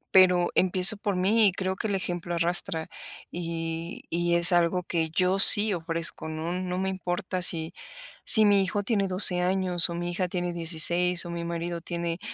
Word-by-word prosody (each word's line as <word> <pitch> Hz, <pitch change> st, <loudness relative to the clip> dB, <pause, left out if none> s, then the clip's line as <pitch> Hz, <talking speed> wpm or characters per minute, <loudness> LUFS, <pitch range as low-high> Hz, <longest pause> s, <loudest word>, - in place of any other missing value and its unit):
pero 180 Hz, -2 st, +3 dB
empiezo 185 Hz, +3 st, +4 dB
por 205 Hz, -1 st, -4 dB
mí 205 Hz, +4 st, +1 dB
y -, -, +1 dB
creo 190 Hz, 0 st, -5 dB
que 220 Hz, -, -6 dB
el 205 Hz, -, -3 dB
ejemplo 175 Hz, -2 st, -6 dB
arrastra, 170 Hz, -1 st, -2 dB, 0.4 s
y 165 Hz, -1 st, -7 dB
y 170 Hz, 0 st, -2 dB
es 170 Hz, +1 st, +6 dB
algo 175 Hz, +1 st, -1 dB
que 165 Hz, -2 st, -4 dB
yo 185 Hz, +4 st, -2 dB
sí 205 Hz, +1 st, +7 dB
ofrezco, 165 Hz, -1 st, -5 dB
¿no?, 155 Hz, +2 st, -7 dB
no 180 Hz, 0 st, -6 dB
me 190 Hz, +1 st, -3 dB
importa 185 Hz, 0 st, -6 dB
si 165 Hz, -2 st, -1 dB, 0.5 s
si 220 Hz, -1 st, +8 dB
mi 200 Hz, -1 st, +2 dB
hijo 205 Hz, +2 st, -4 dB
tiene 200 Hz, -2 st, -2 dB
12 185 Hz, -1 st, +7 dB
años 180 Hz, -2 st, -1 dB
o 170 Hz, -, -7 dB
mi 175 Hz, 0 st, -6 dB
hija 180 Hz, +1 st, -4 dB
tiene 175 Hz, -1 st, -5 dB
16 170 Hz, +2 st, 0 dB
o 175 Hz, -, -9 dB
mi 170 Hz, 0 st, -7 dB
marido 170 Hz, 0 st, -6 dB
tiene 170 Hz, 0 st, -6 dB
175 Hz, 185 wpm, -24 LUFS, 170-185 Hz, 0.5 s, si